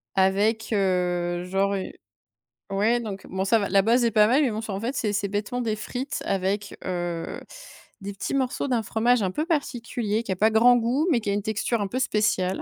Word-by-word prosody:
Avec, 205 +4 +2
heu, 180 -2 0
genre, 195 +2 0
u 190 - -3 0.8
ouais, 215 +5 +1
donc 200 -4 -7
bon, 190 0 -2
ça 220 +3 +3
va, 200 - -1
la 195 +1 +4
base 235 +4 +3
est 230 - +2
pas 210 -1 +5
mal, 260 +6 +3
mais 275 - +2
bon, 215 -1 -3
c'est, 220 - -6
en 195 - -3
fait, 240 +6 -3
c'est 215 -4 0
c'est 205 0 -1
bêtement 205 +5 -3
des 225 -3 -1
frites 255 +5 -5
avec, 195 +1 -2
heu, 175 -2 -3 0.6
des 200 +1 -5
petits 195 +5 -4
morceaux 265 0 -1
d'un 245 -3 +1
fromage 225 +4 +2
un 185 - 0
peu 305 +11 -2
particulier, 235 - -2
qui 205 - -5
a - - 0
pas 215 +3 +4
grand 240 +3 +6
goût, 245 +6 +1
mais 255 - +3
qui 210 - -3
a - - +1
une 205 - 0
texture 220 +1 -1
un 200 - -1
peu 250 +7 -3
spéciale. 210 -6 0
210 Hz, 225 wpm, -25 LUFS, 195-235 Hz, 0.8 s, grand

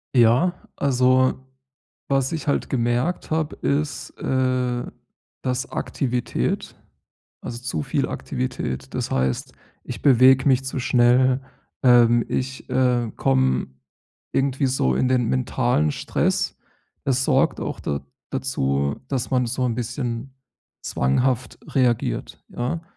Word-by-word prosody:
Ja, 120 +10 +5 0.2
also, 130 -1 +3 0.8
was 135 -1 +1
ich 160 -3 -4
halt 140 - 0
gemerkt 125 +8 0
habe, 160 -1 -1
ist, 145 +1 -1
äh, 130 -2 0 0.6
dass 130 +2 -2
Aktivität 125 -3 -2 0.7
also, 120 - -5
zu 125 +3 -3
viel 140 0 -1
Aktivität, 125 - -4
das - - -2
heißt, 65 0 -1 0.3
ich - - -7
bewege 130 0 +6
mich 135 -1 +3
zu 135 0 -3
schnell, 125 +2 +4 0.4
ähm, 120 -2 +5
ich, 130 +1 -3
äh, 125 -3 +2
komme 65 -1 +2 0.6
irgendwie 135 0 +1
so 95 - +1
in 125 - +1
den 125 -2 +2
mentalen 75 +3 +1
Stress, - - -1 0.5
das 130 -1 +1
sorgt - - +2
auch - - -4
da 70 -1 -3 0.3
dazu, 70 - -1
dass 130 -2 -2
man 125 -2 +2
so 125 +2 -1
'n 115 - -1
bisschen 120 +1 -4 0.5
zwanghaft 125 - 0
reagiert, 120 - 0
ja? 130 +7 -3
125 Hz, 120 wpm, -23 LUFS, 120-135 Hz, 0.8 s, bewege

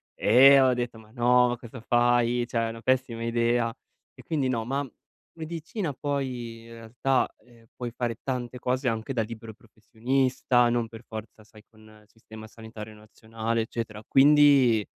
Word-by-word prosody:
e 135 +5 +6
ho 130 -1 +4
detto: 120 -2 -4
"Ma 110 -1 -18
no! 125 +1 +3
Ma 120 - -2
cosa 120 +1 -11
fai? 120 0 +2
Cioè 115 - -2
è - - -4
una 115 0 -9
pessima 125 -1 -1
idea!" 115 0 +1 0.4
E - - -14
quindi 145 -5 -1
no, 120 -3 -1
ma 135 +3 -2 0.5
medicina 165 +2 -5
poi 125 -5 -4
in 115 - -14
realtà, 120 +4 -1 0.2
ehm, 120 -2 -21
puoi 120 -1 -5
fare 120 -1 -3
tante 125 -2 -4
cose 125 +2 -1
anche 115 +3 -2
da 115 -3 0
libero 110 0 -9
professionista, 120 +3 0
non 120 -1 0
per 115 +1 -12
forza, 110 0 -9
sai, 105 0 -18
con 110 -1 -22 0.2
il - - -27
sistema 110 0 -13
sanitario 110 -1 -11
nazionale, 110 +2 -4
eccetera. 110 -1 -6
Quindi 135 -6 +5
120 Hz, 165 wpm, -26 LUFS, 115-130 Hz, 0.5 s, e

